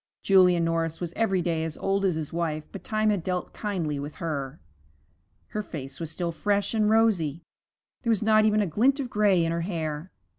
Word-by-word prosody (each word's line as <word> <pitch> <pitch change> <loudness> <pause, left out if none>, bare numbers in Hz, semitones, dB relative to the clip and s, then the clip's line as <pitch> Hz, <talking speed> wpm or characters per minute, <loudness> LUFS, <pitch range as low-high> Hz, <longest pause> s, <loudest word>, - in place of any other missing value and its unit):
Julia 185 -3 +5
Norris 165 -1 0
was 175 -1 -4
every 195 -5 +1
day 165 -2 0
as 160 -1 -4
old 195 0 0
as 180 -4 +2
his 155 -1 -5
wife, 160 -2 -1
but 195 - -8
time 215 0 +1
had 200 -4 0
dealt 180 +1 -3
kindly 170 -9 -2
with 145 +2 -6
her. 145 -3 -4 0.9
Her 210 - -3
face 140 -8 -8
was 165 -2 -4
still 170 +2 -2
fresh 200 +5 0
and 215 -1 +2
rosy; 185 -9 +2 0.6
there 235 - -2
was 220 -2 +2
not 215 0 +5
even 215 0 +3
a - - +2
glint 245 - +2
of 260 -3 -4
gray 200 -5 +3
in 165 - 0
her 170 0 -1
hair. 160 -2 -3
175 Hz, 200 wpm, -26 LUFS, 160-210 Hz, 0.9 s, Julia